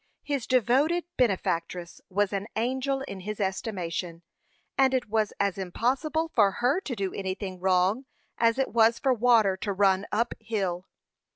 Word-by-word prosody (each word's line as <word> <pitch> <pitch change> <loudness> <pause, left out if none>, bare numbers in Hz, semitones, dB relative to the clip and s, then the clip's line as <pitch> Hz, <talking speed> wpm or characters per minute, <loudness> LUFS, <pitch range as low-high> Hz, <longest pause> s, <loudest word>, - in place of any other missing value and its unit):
His 280 -5 -2
devoted 265 - +2
benefactress 175 -6 -1
was 205 +1 0
an 200 +1 -2
angel 260 +4 -1
in 200 -8 -6
his 210 +3 -6
estimation, 180 -4 -3 0.5
and 265 -1 +3
it 250 -1 -1
was 215 -2 +1
as 200 -1 0
impossible 270 - -1
for 200 -4 +4
her 255 +8 +1
to 265 -9 -4
do 195 -3 -3
anything 190 -1 -4
wrong 190 +7 +2 0.3
as 230 +1 +3
it 270 - 0
was 230 0 +4
for 265 +1 +2
water 225 -5 +4
to 200 +2 -3
run 195 0 +2
up 230 +3 0
hill. 195 -5 -3
215 Hz, 155 wpm, -27 LUFS, 190-250 Hz, 0.5 s, for